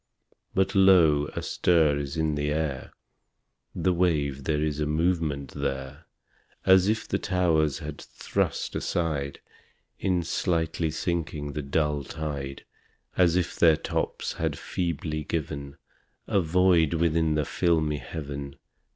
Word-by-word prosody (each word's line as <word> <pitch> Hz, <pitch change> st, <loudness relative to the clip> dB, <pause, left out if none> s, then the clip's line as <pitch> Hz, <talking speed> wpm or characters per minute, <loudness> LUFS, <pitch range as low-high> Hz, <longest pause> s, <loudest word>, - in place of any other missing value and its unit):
But 95 Hz, 0 st, +2 dB
lo, 85 Hz, -7 st, +5 dB
a -, -, -3 dB
stir 80 Hz, -5 st, +2 dB
is 70 Hz, +1 st, -5 dB
in 80 Hz, -1 st, +1 dB
the 75 Hz, 0 st, -1 dB
air! 75 Hz, -4 st, -2 dB, 0.8 s
The 95 Hz, -, +1 dB
wave 75 Hz, -6 st, 0 dB
there 75 Hz, -1 st, +1 dB
is 75 Hz, -1 st, -1 dB
a 75 Hz, -, 0 dB
movement 80 Hz, -3 st, 0 dB
there! 70 Hz, +2 st, -4 dB, 0.6 s
As 95 Hz, 0 st, +6 dB
if 110 Hz, +1 st, 0 dB
the -, -, -1 dB
towers 80 Hz, -6 st, +1 dB
had 75 Hz, -2 st, -7 dB
thrust -, -, -2 dB
aside, 75 Hz, -5 st, -2 dB, 0.6 s
In 90 Hz, -2 st, +1 dB
slightly 80 Hz, -1 st, 0 dB
sinking, 80 Hz, -3 st, -3 dB
the 75 Hz, -, -3 dB
dull 75 Hz, +1 st, 0 dB
tide 70 Hz, -2 st, -5 dB, 0.5 s
As 90 Hz, -2 st, +4 dB
if 90 Hz, -1 st, 0 dB
their 80 Hz, -3 st, +5 dB
tops -, -, -3 dB
had -, -, -2 dB
feebly 80 Hz, -4 st, -3 dB
given 70 Hz, -3 st, -4 dB, 0.5 s
A 100 Hz, -, +2 dB
void 85 Hz, -1 st, +3 dB
within 80 Hz, -1 st, +2 dB
the 75 Hz, -1 st, +1 dB
filmy 80 Hz, -3 st, +1 dB
Heaven. 70 Hz, -3 st, -6 dB
80 Hz, 130 wpm, -27 LUFS, 75-85 Hz, 0.8 s, As